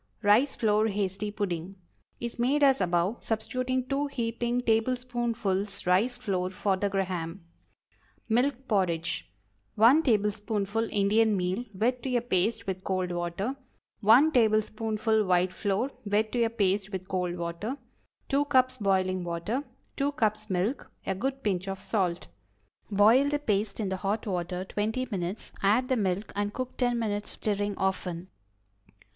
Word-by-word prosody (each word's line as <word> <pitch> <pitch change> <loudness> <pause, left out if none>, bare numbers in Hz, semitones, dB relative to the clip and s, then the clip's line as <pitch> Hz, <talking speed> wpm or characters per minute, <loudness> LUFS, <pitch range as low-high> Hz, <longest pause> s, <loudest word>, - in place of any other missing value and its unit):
RICE 225 +7 +4
FLOUR 215 0 +2
HASTY 200 0 -2
PUDDING 195 -3 -3 0.4
Is 235 0 -5
made 275 +5 +2
as 270 -1 +5
above, 180 +4 0
substituting 255 +3 -1
two 280 +2 0
heaping 240 -2 -1
tablespoonfuls 230 -4 -1
rice 205 +8 +2
flour 190 -7 -1
for 190 +1 0
the 200 +2 -1
Graham. 185 -2 -3 0.8
MILK 255 +3 +1
PORRIDGE. 165 - 0 0.4
1 235 +9 +6
tablespoonful 210 -2 0
Indian 210 +1 +3
meal 185 +6 -1
} - - -28
wet 245 +3 +1
to 255 0 -2
a - - 0
paste 220 -1 0
with 190 -1 -4
cold 185 -2 -1
1 225 - +1
tablespoonful 220 -2 +2
white 180 -1 +2
flour 205 +8 -1
} 205 -3 0
water. 180 +6 -2 0.5
2 280 +1 +2
cups 255 -2 +3
boiling 185 -3 +1
water. 175 +10 -2 0.3
2 285 +1 0
cups 215 -5 0
milk. 190 +8 -1
A 190 - 0
good 265 +7 -3
pinch 190 -2 -1
of 195 0 -4
salt. 185 -4 -1 0.6
Boil 220 +7 +5
the 295 - +1
paste 215 -7 -1
in 205 -3 -1
the 190 - -2
hot 200 +3 -2
water 180 -2 -2
twenty 220 +6 -2
minutes; 185 +1 -4
add 220 +6 +3
the 260 - +3
milk 200 -2 -1
and 205 0 -2
cook 255 0 -4
ten 245 -2 +1
minutes 210 -2 -2
more, - - -13 0.2
stirring 205 0 -2
often. 185 -2 -2
210 Hz, 140 wpm, -28 LUFS, 190-240 Hz, 0.8 s, 1